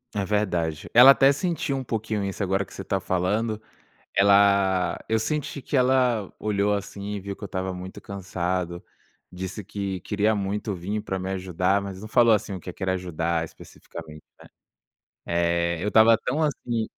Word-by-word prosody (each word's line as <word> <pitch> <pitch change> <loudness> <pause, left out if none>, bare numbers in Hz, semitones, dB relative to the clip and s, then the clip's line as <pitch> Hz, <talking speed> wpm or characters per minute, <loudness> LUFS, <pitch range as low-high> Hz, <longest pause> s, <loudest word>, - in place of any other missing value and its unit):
É 100 - 0
verdade. 90 -6 -1
Ela 125 +3 +10
até 135 0 +5
sentiu 160 -3 -2
um 135 - -3
pouquinho 110 -3 -2
isso, 100 +1 -4
agora 95 0 +1
que - - -17
você 95 - -7
tá 95 - -1
falando, 105 +5 -1 0.5
ela 100 -2 +4
eu 110 - +2
senti 140 +4 -3
que 140 - -2
ela 125 -5 +2
olhou, 105 -1 +1
assim, 100 0 -5
e 100 - -4
viu 100 +1 -5
que - - -22
eu - - -3
estava 95 0 -3
muito 90 +1 -8
cansado, 90 -2 -3 0.5
disse 95 +3 -6
que 100 -1 -4
queria 105 +3 +1
muito 100 +1 -2
vir 95 +4 -3
pra 95 - -3
me 95 +1 -4
ajudar, 95 +1 0
mas 100 -1 -7
não 110 - -7
falou, 115 0 +5
assim, 105 -1 -2
o 95 - -5
que 90 - -7
que 95 - -13
era 95 0 +1
ajudar 85 -2 -1
especificamente, 80 0 -11 1.1
né. 85 0 +1
Eh, - - -4
eu 105 - 0
tava 110 +1 +6
tão, 140 +5 -1
assim 120 -7 -1
100 Hz, 180 wpm, -25 LUFS, 90-110 Hz, 1.1 s, Ela